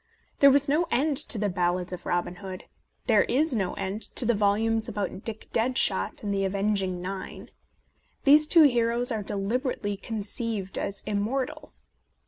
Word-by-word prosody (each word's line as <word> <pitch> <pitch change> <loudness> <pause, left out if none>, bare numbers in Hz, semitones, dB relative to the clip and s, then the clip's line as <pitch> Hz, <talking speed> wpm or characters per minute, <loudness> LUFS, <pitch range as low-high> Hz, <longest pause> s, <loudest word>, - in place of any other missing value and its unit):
There 280 - +8
was 280 +1 +3
no 315 +5 +1
end 285 +3 +1
to 235 - +4
the 210 0 0
ballads 180 0 -1
of 175 -1 -8
Robin 175 0 -2
Hood; 190 -2 -8 0.4
there - - +4
is 290 +1 +1
no 190 -4 -1
end 195 +2 -4
to 250 - +1
the 240 - +3
volumes 220 +2 +1
about 200 -2 -4
Dick 225 -1 -4
Deadshot 225 -5 +1
and 205 -1 -2
the 195 0 0
Avenging 195 -2 -1
Nine. 190 +1 -7 0.7
These 300 +2 +6
two 330 0 +6
heroes 240 -2 +2
are 220 -2 -2
de 205 - -3
liberately 205 0 -2
conceived 215 -2 -3
as 200 0 -4
immortal. 220 +6 -3
210 Hz, 160 wpm, -26 LUFS, 195-245 Hz, 0.7 s, There